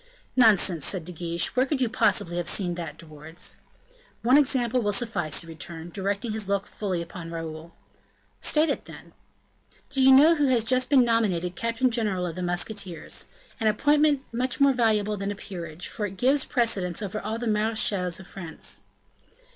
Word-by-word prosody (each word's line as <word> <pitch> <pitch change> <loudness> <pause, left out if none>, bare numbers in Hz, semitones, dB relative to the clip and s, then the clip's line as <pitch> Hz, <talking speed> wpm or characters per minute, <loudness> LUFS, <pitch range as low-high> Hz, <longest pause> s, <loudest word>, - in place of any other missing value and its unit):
"Nonsense," 200 - +4
said 180 -1 -2
De 180 - -7
Guiche, 170 0 -2
"where 255 +2 +3
could 285 -1 -1
you 255 - +2
possibly 190 -5 +1
have 175 - -2
seen 180 -3 0
that, 170 -4 -6
De - - -12
Wardes?" 155 +2 -7 0.7
"One 250 +3 +5
example 255 -4 +3
will 205 -2 0
suffice," 200 -10 0
he - - -9
returned, 165 +1 -6
directing 200 +3 -2
his 215 -2 -3
look 200 0 0
fully 185 -5 -3
upon 170 -1 -9
Raoul. 165 0 -7 0.6
"State 310 +1 +3
it - - -2
then." - - -13 0.8
"Do 270 - +1
you 265 0 +7
know 290 +5 +8
who 295 -3 +2
has 245 -4 +3
just 255 +2 +1
been 265 -4 +5
nominated 190 -7 0
captain 230 +4 0
general 210 -6 0
of 170 - -4
the 185 - -6
musketeers? 175 -1 -2 0.3
an 220 - +1
appointment 290 +5 +3
more 260 +3 +2
valuable 215 -4 +1
than 200 0 -3
a 205 - -3
peerage; 175 -4 -7
for 210 -2 -3
it 190 0 -10
gives 265 +5 +3
precedence 205 -6 +1
over 205 +1 -4
all 220 +1 -3
the 240 - -5
marechals 210 -5 0
of 190 - -11
France." 170 -4 -6
205 Hz, 180 wpm, -26 LUFS, 175-245 Hz, 0.8 s, know